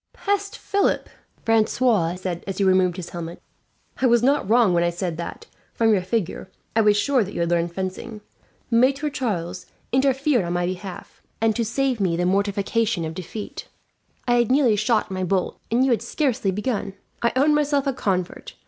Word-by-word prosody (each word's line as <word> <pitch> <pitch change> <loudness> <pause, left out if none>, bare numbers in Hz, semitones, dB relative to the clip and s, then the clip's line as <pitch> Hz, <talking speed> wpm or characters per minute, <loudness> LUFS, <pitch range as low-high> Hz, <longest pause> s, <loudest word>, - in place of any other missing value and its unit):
"Peste, 405 0 -2
Philip!" 400 0 0 0.4
Francois 220 -5 +2
said, 180 -2 -4
as 195 -1 -4
he 200 - +1
removed 185 -2 +3
his 180 -2 -6
helmet. 170 -1 -6 0.6
"I 260 - +4
was 235 -1 +4
not 275 -5 +2
wrong 230 -5 +4
when 170 0 +3
I 175 - +2
said 175 -1 -3
that, 170 - -6 0.3
from 225 -1 +3
your 195 - +2
figure, 190 -1 -3 0.3
I 225 - +5
was 210 -1 +4
sure 260 +2 +2
that 200 - -8
you - - -3
had 170 0 0
learned 170 0 +1
fencing. 190 +4 -5 0.5
Maitre 270 +5 +3
Charles 185 -9 -3 0.2
interfered 270 -1 +2
on 175 0 -3
my 175 0 0
behalf, 185 +1 -7 0.2
and 225 -1 +2
to 235 - 0
save 250 +2 0
me 180 -4 +1
the 175 - 0
mortification 200 0 0
of 160 - -4
defeat. 185 +4 -7 0.6
I 240 0 +4
had 240 -1 +2
nearly 255 -4 +4
shot 215 0 +1
my 185 0 -2
bolt, 185 0 -1
and 245 +3 +3
you 265 - +2
had 235 - +2
scarcely 260 -9 -1
begun. 205 0 -2 0.3
"I 235 - +2
own 285 +3 +4
myself 290 -1 +1
a 275 - 0
convert. 195 - -3
210 Hz, 185 wpm, -23 LUFS, 185-250 Hz, 0.6 s, I